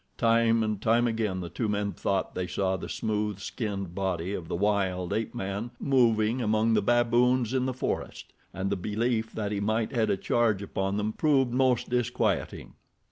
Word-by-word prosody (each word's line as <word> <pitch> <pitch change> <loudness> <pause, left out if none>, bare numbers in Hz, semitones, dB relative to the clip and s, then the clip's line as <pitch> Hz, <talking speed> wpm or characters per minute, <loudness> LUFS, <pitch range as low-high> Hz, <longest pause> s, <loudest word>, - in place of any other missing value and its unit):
Time 115 0 +3
and 105 -2 -2
time 115 +2 +3
again 110 -5 -1
the 85 - -6
two 110 +3 -2
men 100 0 -1
thought 95 -1 -2
they 90 -1 -3
saw 95 +1 0
the - - -6
smooth 105 -2 -2
skinned 100 -4 -4
body 95 -1 -2
of 90 -5 -5
the - - -3
wild 95 -2 0
ape 110 0 -2
man 100 +4 -3
moving 120 -3 +2
among 110 0 +2
the 105 - +3
baboons 120 +2 +2
in 130 -1 +1
the - - 0
forest, - - -4 0.2
and 95 +2 -3
the - - +2
belief 110 +4 -1
that 105 -2 -3
he 100 - -1
might 110 +2 0
head 115 -4 +1
a - - +1
charge 110 -2 +1
upon 95 0 -2
them 105 +1 -1
proved 135 -4 +2
most 130 0 +2
disquieting. 120 -1 -1
110 Hz, 185 wpm, -28 LUFS, 100-120 Hz, 0.2 s, Time